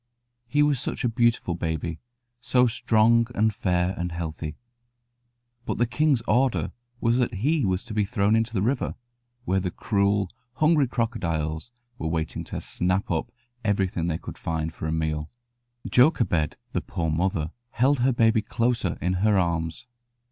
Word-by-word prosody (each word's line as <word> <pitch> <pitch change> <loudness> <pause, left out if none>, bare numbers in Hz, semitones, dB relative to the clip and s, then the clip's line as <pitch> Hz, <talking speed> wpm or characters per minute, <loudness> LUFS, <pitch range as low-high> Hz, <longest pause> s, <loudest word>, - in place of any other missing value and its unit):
He 145 +4 +3
was 145 -3 +2
such 140 - -4
a - - +3
beautiful 115 -5 +1
baby, 80 -1 -3 0.4
so 125 +1 +3
strong 115 0 +3
and 110 +1 +2
fair 90 -2 0
and 90 0 -3
healthy; 80 -2 -4 1.1
but - - -3
the 120 - +3
king's 140 0 +2
order 125 +3 +2 0.3
was 120 +1 +2
that 120 -3 0
he 145 +9 +1
was 95 0 0
to 120 -3 -8
be 105 -1 +2
thrown 105 0 +2
into 115 +1 +1
the 100 -4 0
river, 125 +4 0 0.5
where 95 -5 +2
the 90 -1 -2
cruel, 100 0 +1 0.2
hungry 155 -1 +3
crocodiles 85 - -2 0.3
were 80 - -2
waiting 80 0 -2
to - - -5
snap 90 +3 -1
up 120 - -1 0.3
everything 95 -5 0
they 80 -2 0
could - - -9
find 80 -1 -2
for 80 - -5
a - - -1
meal. 80 -1 -1 0.6
Jochebed, 120 - +3 0.2
the - - 0
poor 85 -4 -2
mother, 80 -1 0 0.2
held 130 +3 +2
her 130 +2 +3
baby 115 -2 +3
closer 115 -6 0
in 90 +1 +1
her 105 -1 +4
arms. 85 +4 -1
105 Hz, 160 wpm, -25 LUFS, 85-120 Hz, 1.1 s, her